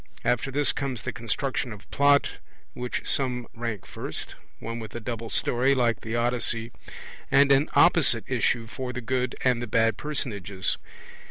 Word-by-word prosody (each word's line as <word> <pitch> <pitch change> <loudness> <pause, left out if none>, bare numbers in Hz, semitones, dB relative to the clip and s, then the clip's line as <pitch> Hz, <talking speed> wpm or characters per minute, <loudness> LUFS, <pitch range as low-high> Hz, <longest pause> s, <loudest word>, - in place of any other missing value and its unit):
After 125 +2 +1
this 145 +2 +3
comes 130 -7 -3
the - - -3
construction 125 +2 -2
of 105 -1 -10
Plot 140 0 +3 0.3
which 125 0 -4
some 125 -3 0
rank 115 -5 -4
first, - - -4 0.2
one 115 +1 -5
with 110 0 -8
a - - -3
double 115 0 -5
story 130 +3 +2
(like 120 -3 +1
the 110 +1 -4
Odyssey) 120 -1 0 0.6
and 140 +1 +5
an 140 +2 +4
opposite - - +5
issue 115 -2 +1
for 125 +3 -5
the 125 - -4
good 125 +1 -1
and 125 -2 +2
the 120 - -4
bad 115 +1 +2
personages. 100 -10 -2
120 Hz, 160 wpm, -26 LUFS, 115-130 Hz, 0.6 s, and